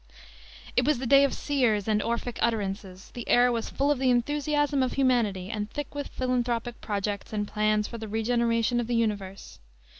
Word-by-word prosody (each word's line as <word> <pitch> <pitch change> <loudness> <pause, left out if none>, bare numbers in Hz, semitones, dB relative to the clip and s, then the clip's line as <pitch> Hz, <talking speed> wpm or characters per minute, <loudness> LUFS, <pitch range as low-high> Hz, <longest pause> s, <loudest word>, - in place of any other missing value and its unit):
It 250 - +3
was 295 +1 +2
the 260 - -4
day 275 +3 +6
of 280 - +2
seers 240 -8 0
and 210 -1 +2
"Orphic" 235 +1 -3
utterances; 195 -4 -2
the 240 - -7
air 245 0 +5
was 230 -1 -2
full 280 +1 +1
of 285 - 0
the 260 -1 +2
enthusiasm 290 +3 +1
of 255 - 0
humanity 225 -8 +1
and 210 -1 -3
thick 290 +4 -6
with 285 -1 -4
philanthropic 240 -2 -2
projects 205 0 -3
and 205 -1 -1
plans 215 0 +1
for 235 - -8
the 220 - -6
regeneration 230 +2 +1
of 240 - -2
the 240 - 0
universe. 205 -4 -3
235 Hz, 185 wpm, -27 LUFS, 210-255 Hz, -, day